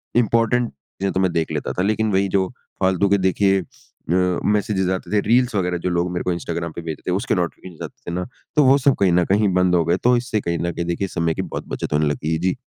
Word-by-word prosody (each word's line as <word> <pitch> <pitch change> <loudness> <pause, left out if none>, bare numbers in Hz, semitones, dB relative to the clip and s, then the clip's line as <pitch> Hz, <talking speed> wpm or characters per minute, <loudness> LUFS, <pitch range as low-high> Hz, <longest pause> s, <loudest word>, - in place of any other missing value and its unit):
Important 115 +1 +2
चीज़ें 95 +8 -5
तो - - 0
मैं 95 -2 +2
देख 80 -1 -1
लेता - - -2
था। 90 - -2
लेकिन 110 +1 +1
वही 95 +1 +2
जो 95 -1 +2 0.3
फालतू 95 +1 +2
के 100 - +4
देखिए 95 +1 +2
अ, - - -11 0.8
मैसेजेस 105 -3 +1
आते 95 - -8
थे - - +5
रील्स 120 0 +3
वग़ैरह 90 -2 0
जो - - +2
लोग 85 0 0
मेरे 90 - -2
को 90 - 0
इंस्टाग्राम 85 -1 -4
पे 85 - -5
भेजते 80 -2 -6
थे - - +1
उसके - - 0
नोटिफ़िकेशन 90 -4 -4
आते - - -8
थे - - -3
ना, 90 0 -2 0.3
तो 150 - +5
वो 135 +1 +6
सब 140 -1 +3
कहीं 95 -3 +4
न 90 0 +3
कहीं 100 +1 +2
बंद 90 -1 +3
हो 85 - +3
गए 85 +2 +2
तो 125 +1 +5
इससे 120 -3 -1
कहीं 85 -2 -2
न 85 - -1
कहीं 85 - -3
देखिए 85 +3 -1
समय 85 -3 -1
की - - -3
बहुत - - -6
बचत - - -4
होने 75 +1 +2
लगी 75 +2 -2
है। 80 - 0
जी। 90 +2 0
95 Hz, 260 wpm, -21 LUFS, 85-105 Hz, 0.8 s, वो